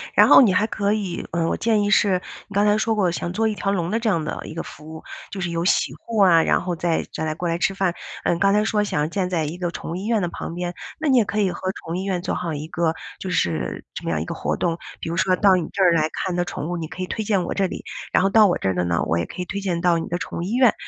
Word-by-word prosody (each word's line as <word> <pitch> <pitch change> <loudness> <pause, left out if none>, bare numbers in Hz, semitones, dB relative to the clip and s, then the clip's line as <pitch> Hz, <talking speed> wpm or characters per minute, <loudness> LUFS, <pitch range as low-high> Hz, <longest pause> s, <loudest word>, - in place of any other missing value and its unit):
然 - - +7
后 - - +10
你 215 -8 +5
还 205 +3 +3
可 205 -2 0
以 200 -5 -3
呃， 170 -1 +1
我 - - -1
建 220 -2 +2
议 205 - 0
是 190 -4 +3 0.3
你 - - -12
刚 200 +1 +3
才 210 0 +4
说 225 +1 +1
过 190 -5 +2
想 175 +1 -3
做 220 +3 +1
一 - - -1
条 200 - -2
龙 175 -3 -1
的 225 - +1
这 230 -1 0
样 170 -6 +1
的 155 - -4
一 - - -7
个 165 - -4
服 155 +1 -11
务， 160 - -10 0.3
就 195 - -6
是 175 - -1
有 170 0 -2
洗 - - +2
护 225 -2 -3
啊， 175 -4 +6
然 - - +2
后 180 0 -2
再 165 0 0
再 160 - -3
来 155 0 -2
过 175 +1 -2
来 165 - 0
吃 195 - +1
饭。 190 -3 +1 0.3
呃， - - +2
刚 195 +3 +3
才 210 +1 +3
说 215 -1 +1
想 200 -7 -1
要 150 - +1
建 180 +2 -2
在 170 -3 0
一 155 +3 -4
个 175 -1 -2
宠 165 - -6
物 - - -3
医 190 +3 -5
院 225 -1 +1
的 175 - -1
旁 170 - -6
边， 175 0 -3 0.3
那 315 - +1
你 260 - +5
也 230 - +4
可 210 +1 -1
以 190 -2 +2
和 185 - -4
宠 165 - -9
物 - - -1
医 185 - -2
院 190 -3 -1
做 - - -2
好 170 -3 -3
一 150 +1 -5
个 160 +1 0 0.3
就 190 - -5
是 80 - -1
这 - - -7
么 - - -1
样 - - 0
一 - - -3
个 - - -4
活 - - -2
动， 170 -1 -1 0.2
比 - - -4
如 170 - -3
说 185 +2 +3
到 195 0 +5
你 175 -4 -1
这 195 - +1
儿 180 - +6
来 155 -2 +2
看 185 - -2
的 175 0 0
宠 160 -1 -5
物， 175 - -2
你 160 -2 -4
可 185 - -6
以 - - -4
推 220 +3 -3
荐 200 -3 +1
我 - - -3
这 195 - +1
里， - - -7 0.3
然 - - +4
后 195 - +3
到 215 +1 +6
我 175 - +1
这 95 - -1
儿 95 - -1
的 90 0 0
呢， 85 -1 +1
我 80 - 0
也 85 - -1
可 180 - -7
以 - - -3
推 195 +3 -4
荐 180 -4 -2
到 175 -1 +3
你 165 - -3
的 175 - -2
宠 - - -5
物 - - -2
医 195 +5 -3
院， 250 -2 +5
180 Hz, 360 characters per minute, -22 LUFS, 165-200 Hz, 0.3 s, 后